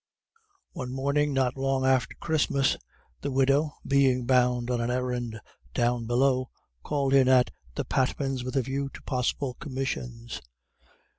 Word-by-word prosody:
One 125 -1 -5
morning 140 +3 +1
not 130 -2 +1
long 135 0 0
after 130 -4 +2
Christmas, 145 -3 +1 0.5
the 140 - -2
widow, 140 +3 +2
being 135 -3 +3
bound 125 -1 +2
on 120 -1 0
an 115 - -1
errand 125 -3 -2 0.4
down 120 -1 +1
below, 130 +1 +2 0.3
called 140 - 0
in 135 -2 +6
at 130 -1 +5 0.2
the - - -2
Patmans' 135 0 0
with 130 +2 -5
a 135 - +2
view 135 +2 -2
to - - -11
possible 130 0 -1
commissions. 125 -4 -4
130 Hz, 140 wpm, -27 LUFS, 125-135 Hz, 0.5 s, in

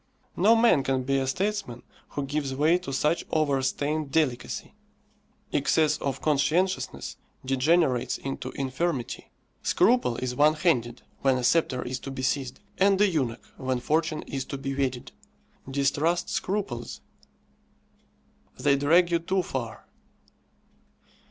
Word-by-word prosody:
No 215 +6 +5
man 230 -10 +5
can 130 -1 0
be 135 +1 +1
a 135 - -1
statesman 185 - -2 0.3
who 145 - -3
gives 140 -1 -2
way 155 +6 +3
to 180 -6 -7
such 150 +5 +1
overstrained 145 0 0
delicacy. 135 -6 -1 0.8
Excess 155 -2 +2
of 135 -2 -3
conscientiousness 155 +6 0 0.3
degenerates 135 0 +2
into 135 -1 -5
infirmity. 135 0 -3 0.3
Scruple 235 - +3
is 130 -1 -2
one 150 +4 +4
handed 125 -8 0 0.2
when 135 -1 +2
a 125 - -3
sceptre 130 -2 +2
is 125 0 -4
to - - -7
be 130 -1 -5
seized, 130 -1 -1 0.2
and 195 0 +4
a 210 - +5
eunuch 135 -11 -2
when 130 -1 -1
fortune 155 +4 0
is 135 -1 -4
to 140 - -5
be 135 0 -4
wedded. 130 -3 -2 0.6
Distrust 145 +5 +1
scruples; 190 - -3 1.6
they 140 -1 +3
drag 170 +5 +4
you 170 - +3
too 185 +2 0
far. 120 -8 -5
140 Hz, 130 wpm, -27 LUFS, 130-165 Hz, 1.6 s, No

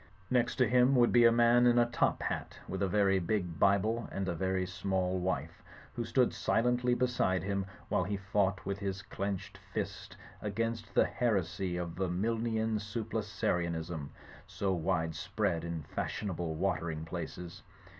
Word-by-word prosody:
Next 120 -1 +2
to 125 -3 +3
him 125 +3 +4
would 120 -1 +5
be 120 -1 +6
a 115 - +8
man 120 +1 +5
in 120 0 +5
a 120 - +6
top 120 0 0
hat - - -3
with 95 +2 -4
a 100 - +2
very 95 0 +3
big 90 -3 -2
Bible 110 +4 +2
and 95 -1 -2
a 90 - 0
very 95 +1 0
small 95 0 -1
wife, 95 +1 -2 0.3
who 120 - -2
stood 125 +2 +2
silently 125 +1 +2
beside 120 -7 +1
him, 100 0 -1 0.2
while - - +1
he 100 +1 -2
fought 95 -1 0
with 100 0 -2
his 95 -1 -3
clenched 100 -1 -4
fist - - -4 0.2
against 115 +2 -3
the - - +6
heresy 95 -5 0
of 85 0 -5
Milnian 110 +4 0
Sublapsarianism 90 -8 -2 0.4
so 95 -2 -1
wide 80 -2 0
spread 95 -2 -1
in 85 -2 -4
fashionable 85 -1 -3
watering 80 -3 -1
places. 85 +1 -6
100 Hz, 155 wpm, -32 LUFS, 90-115 Hz, 0.4 s, a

